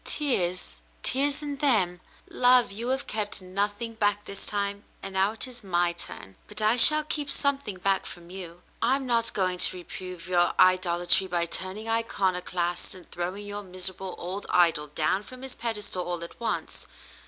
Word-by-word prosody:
Tears? 180 - 0 0.2
Tears 280 +2 +2
in 290 -1 -4
them? 195 -11 +2 0.3
Love, 250 -3 +5
you 225 +4 -5
have 265 +2 0
kept 210 -4 -2
nothing 205 +4 -2
back 205 -2 +1
this 200 0 -3
time, 200 0 -1 0.2
and 195 - -5
now 190 +2 +3
it 225 - -2
is 245 -2 -10
my 175 -2 +2
turn, 95 - -9
but 210 - -8
I 215 +2 +4
shall 305 +5 +6
keep 295 -1 -3
something 280 -9 0
back 195 +1 +1
from 175 0 -10
you. 180 -2 -8 0.2
I'm 265 +4 +2
not 235 -2 +2
going 185 -2 0
to 185 - +3
reprove 180 -1 -8
your 175 -1 +2
idolatry 185 0 +4
by 175 -2 +1
turn 185 +3 -4
ing 220 +1 -7
iconoclast 185 -6 0
and 180 -2 -14
throwing 185 +4 -4
your 205 0 -5
miserable 185 0 -3
old 190 +3 -5
idol 165 -4 +3
down 155 +6 0
from 255 +4 -12
his 265 -1 -4
pedestal 210 -5 -3
all 175 -1 -3
at 170 - -10
once. 235 - -2
195 Hz, 175 wpm, -27 LUFS, 180-230 Hz, 0.3 s, shall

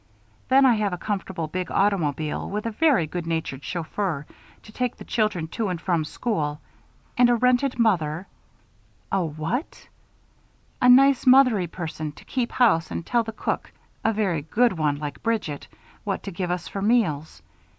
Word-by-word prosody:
Then, 270 +1 +6
I 255 - +6
have 205 -3 0
a - - -2
comfortable 190 -4 -3
big 180 +2 -4
automobile 160 -7 0
with 210 +2 -3
a 230 - -1
very 265 - +3
good 170 +2 -5
natured 160 -5 -3
chauffeur 170 -2 -3 0.4
to 215 - -13
take 250 +2 -2
the - - -11
children 210 -8 0
to 220 +5 -2
and 180 -2 -3
from 165 -2 0
school 150 -6 -2 0.6
and 245 -1 +6
a 240 - +4
rented 250 +2 +2
mother 180 -7 +1 0.5
" - - -36
"A 195 -2 +1
what?" 160 - -4 0.9
"A 250 - +5
nice, 270 +1 +6
mother 255 -3 +7
y 180 -2 -2
person 160 -3 -5
to - - -16
keep 250 -3 -2
house 210 -10 +3
and 170 - -5
tell 240 -1 +2
the 225 -1 -5
cook 220 - -3 0.3
a 225 - +3
very 195 -8 0
good 230 +10 +2
one 155 -4 0
like 145 0 -6
Bridget 220 -11 -2 0.4
what 195 -2 -3
to 200 - -5
give 180 0 -3
us 175 -1 -2
for 195 - -5
meals. 160 - 0
195 Hz, 175 wpm, -24 LUFS, 160-230 Hz, 0.9 s, mother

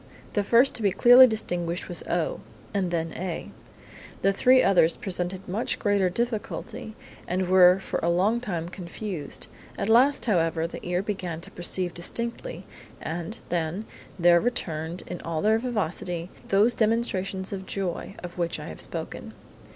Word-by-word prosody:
The 205 - +2
first 235 +6 +4
to 245 - -3
be 200 -2 +3
clearly 245 +6 +8
distinguished 175 -6 -2
was 175 - -6
O, - - 0 0.3
and 195 -3 0
then 165 -1 -1
followed - - -7
A. 180 -3 -4 0.7
The 195 - +4
three 255 +5 +5
others 175 -4 +4
presented 185 0 -3
much 205 +6 -1
greater 200 -3 +2
difficulty, 230 +1 -4 0.3
and 185 +1 0
were 180 0 +7
for - - -3
a 170 - +1
long 195 +7 +2
time 175 -8 -3
confused. 180 -2 -6 0.3
At 200 - -2
last, 260 +5 +4
however, 165 -6 +1
the 170 - -7
ear 180 +1 -1
began 185 -6 -4
to - - -13
perceive 175 0 -1
distinctly, 235 - -4 0.3
and, 170 +7 -5
then, 175 +4 -2 0.3
there 170 -1 +5
returned 170 -8 -2
in 180 - -6
all 165 -2 -3
their 220 +1 +4
vivacity, 180 -7 -3 0.2
those 210 +5 +4
demonstrations 200 -4 0
of 190 -1 -6
joy 195 0 -3
of 175 0 -8
which 170 -1 -1
I - - -7
have - - -8
spoken. - - -5
190 Hz, 160 wpm, -26 LUFS, 175-220 Hz, 0.7 s, clearly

